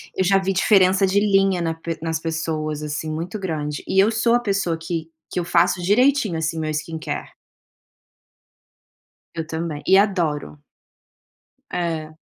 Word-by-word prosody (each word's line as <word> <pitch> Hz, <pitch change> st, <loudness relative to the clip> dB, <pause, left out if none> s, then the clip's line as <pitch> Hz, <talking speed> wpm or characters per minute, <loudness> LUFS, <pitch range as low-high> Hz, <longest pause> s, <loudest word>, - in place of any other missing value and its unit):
eu 190 Hz, -, +1 dB
já 195 Hz, +1 st, +4 dB
vi 190 Hz, 0 st, -1 dB
diferença, 190 Hz, 0 st, +4 dB
de 190 Hz, +1 st, +2 dB
linha 195 Hz, -3 st, +2 dB
na 165 Hz, -1 st, -1 dB
pe 165 Hz, 0 st, -5 dB
nas 160 Hz, -1 st, -2 dB
pessoas, 160 Hz, -2 st, -3 dB
assim, 150 Hz, +1 st, -4 dB
muito 170 Hz, +7 st, -4 dB
grande. 150 Hz, -5 st, -3 dB
E 190 Hz, -, +2 dB
eu 220 Hz, -, +2 dB
sou 230 Hz, +1 st, +2 dB
a 240 Hz, -, +3 dB
pessoa 195 Hz, -7 st, -1 dB
que 165 Hz, 0 st, -4 dB, 0.2 s
que -, -, 0 dB
eu 170 Hz, -, -2 dB
faço 175 Hz, +1 st, +2 dB
direitinho, 215 Hz, -, +3 dB
assim, 160 Hz, 0 st, -2 dB
meu 155 Hz, -, -2 dB
skincare. 155 Hz, +1 st, -4 dB, 2.1 s
Eu 160 Hz, -1 st, -3 dB
também, 160 Hz, -2 st, -4 dB
e 190 Hz, -, +6 dB
adoro. 175 Hz, -8 st, 0 dB, 1.1 s
É. 160 Hz, -3 st, -3 dB
170 Hz, 150 wpm, -22 LUFS, 160-195 Hz, 2.1 s, e